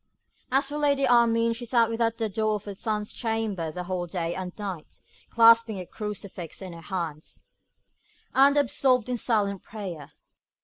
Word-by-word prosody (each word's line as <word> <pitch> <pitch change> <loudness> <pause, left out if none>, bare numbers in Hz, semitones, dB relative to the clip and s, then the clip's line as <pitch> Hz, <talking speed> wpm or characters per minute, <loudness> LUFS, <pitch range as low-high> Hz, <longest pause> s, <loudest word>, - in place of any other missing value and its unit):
As 275 +1 +2
for 295 +1 -3
Lady 280 -2 +2
Armine, 230 -1 +4
she 235 +1 -6
sat 235 -1 +3
without 230 0 0
the 225 - 0
door 215 +1 0
of 205 - -7
her 205 - -5
son's 210 +1 -2
chamber 220 -7 -2
the 180 +3 -5
whole 180 -1 -3
day 170 -1 -3
and 185 0 -5
night, 190 -7 -7 0.3
clasping 230 -2 +5
a 180 - -6
crucifix 200 -5 -6
in 185 -3 -7
her 165 - -10
hands, 165 -4 -5 0.9
and 280 +2 +5
absorbed 255 -2 +2
in 250 - -1
silent 205 -5 0
prayer. 175 -9 -8
215 Hz, 165 wpm, -26 LUFS, 185-235 Hz, 0.9 s, clasping